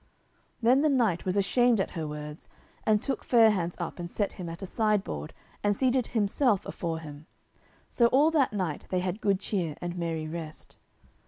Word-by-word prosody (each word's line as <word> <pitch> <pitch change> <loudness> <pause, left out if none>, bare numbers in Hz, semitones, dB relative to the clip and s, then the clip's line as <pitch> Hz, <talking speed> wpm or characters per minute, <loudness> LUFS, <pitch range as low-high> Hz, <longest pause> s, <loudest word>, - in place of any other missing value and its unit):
Then 255 +4 +5
the 305 - +3
knight 230 - +1
was 185 +1 0
ashamed 240 +3 +3
at 190 - -1
her 160 -3 -4
words, 150 0 -7 0.4
and 215 -1 +4
took 275 - -2
Fair 225 -3 +6
hands 175 -4 -2
up 170 0 -5
and 170 0 -5
set 205 +2 -1
him 180 -3 -6
at 170 +4 -7
a - - -2
sideboard, 200 - -1 0.3
and 205 0 +2
seated 255 +1 +1
himself 215 0 +1
afore 165 -2 -3
him. 155 -1 -10 0.6
So 235 - +3
all 285 +6 +4
that 290 -5 +3
night 185 -8 -3
they 185 -1 0
had 185 +3 -3
good 195 -2 +2
cheer 175 -8 -2
and 175 0 -4
merry 165 -3 -3
rest. 155 -1 -8
195 Hz, 185 wpm, -28 LUFS, 165-230 Hz, 0.6 s, Fair